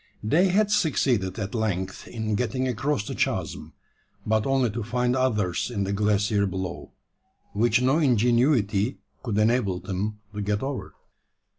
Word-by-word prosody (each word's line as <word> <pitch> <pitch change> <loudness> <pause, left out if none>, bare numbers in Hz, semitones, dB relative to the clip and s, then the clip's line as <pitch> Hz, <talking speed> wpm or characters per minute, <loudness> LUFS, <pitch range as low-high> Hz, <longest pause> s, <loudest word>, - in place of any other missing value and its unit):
They 160 - +3
had 205 +3 +2
succeeded 130 - +1
at 100 -2 -4
length 95 -5 -2
in 110 -2 -3
getting 125 +4 -1
across 130 -1 -1
the - - -5
chasm - - -2 0.5
but 110 +1 +1
only 135 -4 +2
to 115 +3 -4
find 125 +3 0
others 110 -9 0
in 105 -5 -2
the 100 +1 -2
glacier 105 0 +1
below, 95 -1 -5 0.6
which 120 +3 +2
no 135 +5 +3
ingenuity 120 -5 +2 0.2
could 115 -5 -2
enable 105 -4 +2
them 100 +3 -3 0.2
to 105 - -4
get 105 +2 -1
over. 135 0 -5
110 Hz, 145 wpm, -25 LUFS, 100-130 Hz, 0.6 s, They